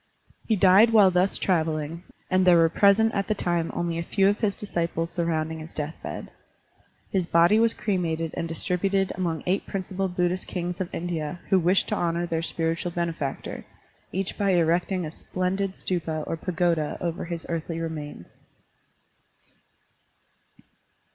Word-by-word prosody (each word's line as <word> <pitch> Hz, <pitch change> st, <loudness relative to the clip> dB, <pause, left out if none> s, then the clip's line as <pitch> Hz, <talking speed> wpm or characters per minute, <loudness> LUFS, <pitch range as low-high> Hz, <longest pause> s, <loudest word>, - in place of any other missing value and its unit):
He 220 Hz, -, +3 dB
died 195 Hz, +3 st, +6 dB
while 210 Hz, -4 st, +6 dB
thus 180 Hz, +2 st, +2 dB
traveling, 160 Hz, -2 st, -1 dB, 0.3 s
and 185 Hz, 0 st, +2 dB
there 180 Hz, -2 st, +6 dB
were 165 Hz, -1 st, +5 dB
present 210 Hz, +5 st, +4 dB
at 200 Hz, -1 st, -1 dB
the 215 Hz, -, +1 dB
time 175 Hz, -3 st, 0 dB
only 170 Hz, -1 st, -2 dB
a -, -, -2 dB
few 195 Hz, +3 st, +2 dB
of 205 Hz, +1 st, +2 dB
his 205 Hz, -3 st, 0 dB
disciples 170 Hz, -4 st, -2 dB
surrovmding 160 Hz, -2 st, -1 dB
his 155 Hz, +1 st, -10 dB
death 150 Hz, +1 st, -3 dB
bed. -, -, -6 dB, 0.8 s
His 185 Hz, -3 st, 0 dB
body 170 Hz, +6 st, +5 dB
was 230 Hz, 0 st, +3 dB
cremated 170 Hz, -6 st, -1 dB
and 165 Hz, -, -3 dB
distributed 190 Hz, +4 st, 0 dB
among 170 Hz, -4 st, -2 dB
eight 185 Hz, +2 st, 0 dB
principal 190 Hz, 0 st, -2 dB
Buddhist 180 Hz, 0 st, -1 dB
kings 180 Hz, 0 st, -3 dB
of 180 Hz, -, -4 dB
India 165 Hz, -1 st, -3 dB
who 190 Hz, -, +5 dB
wished 180 Hz, +3 st, +2 dB
to -, -, +1 dB
honor 170 Hz, 0 st, 0 dB
their 165 Hz, -1 st, -1 dB
spiritual 165 Hz, +1 st, -1 dB
benefactor, 165 Hz, -5 st, -3 dB, 0.5 s
each 195 Hz, +3 st, -3 dB
by 200 Hz, -2 st, +3 dB
erecting 175 Hz, +2 st, +1 dB
a 155 Hz, -, -5 dB
splendid 185 Hz, +3 st, -2 dB
stupa 160 Hz, -4 st, -2 dB
or -, -, -2 dB
pagoda 165 Hz, -2 st, 0 dB
over 170 Hz, -2 st, -3 dB
his 170 Hz, -1 st, -5 dB
earthly 165 Hz, 0 st, -3 dB
remains. 150 Hz, -, -5 dB
175 Hz, 155 wpm, -26 LUFS, 165-190 Hz, 0.8 s, died